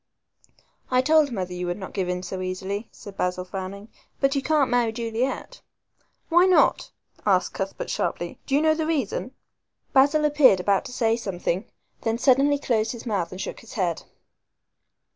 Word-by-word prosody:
"I 255 0 +3
told 310 -1 +4
mother 185 -5 -3
you 180 0 -4
would 175 - -2
not 190 -2 -8
give 185 -3 -1
in 180 0 -2 0.2
easily," 190 +4 -4
said 205 -3 -12
Basil, 180 0 -1
frowning, 195 +2 -6 0.3
"but 275 -1 +2
you 275 - 0
can't 295 -2 +2
marry 240 -2 +2
Juliet." 230 +3 -3 0.7
"Why 350 +2 +5
not?" 370 - +3 0.3
asked - - +2
Cuthbert - - -4
sharply; - - -3
"do 275 - +1
you 295 - +3
know 315 0 +5
the 310 0 -2
reason?" 280 -7 -1 0.6
Basil 290 +3 +4
appeared 295 -9 +5
about 195 +1 +1
to - - -7
say 225 -2 +1
something, 190 -3 -3 0.4
then 225 0 0
suddenly 275 +3 +4
closed 225 -5 0
his 235 - -9
mouth 200 -7 -1
and 185 - -8
shook - - -5
his 230 - -13
head. 180 -6 -1
230 Hz, 165 wpm, -25 LUFS, 190-280 Hz, 0.7 s, Why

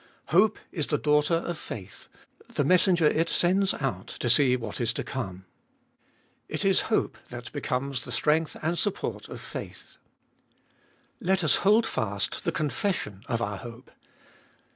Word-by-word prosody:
Hope 195 +7 +4
is 155 -6 -2
the 150 - +1
daughter 150 +3 +3
of 170 -1 -3
faith, 95 -4 -8 0.4
the - - 0
messenger 180 +2 +4
it 160 +2 +3
sends 190 +2 +3
out 125 -10 -3
to 120 - -1
see 125 0 +5
what 115 -2 -5
is 120 0 +2
to - - -3
come: 95 -8 -5 1.0
it - - -2
is - - +4
hope - - 0
that - - -8
becomes 130 +1 -2
the 125 - -8
strength 155 +4 +1
and 165 +3 +1
support 205 -1 -2
of - - -7
faith. - - -8 1.2
Let 190 0 +1
us 155 - +4
hold 215 +4 +4
fast 100 - -2
the - - +2
confession 150 - -2
of 115 -3 -1
our 105 -2 -3
hope. 120 +4 -10
145 Hz, 150 wpm, -27 LUFS, 120-175 Hz, 1.2 s, see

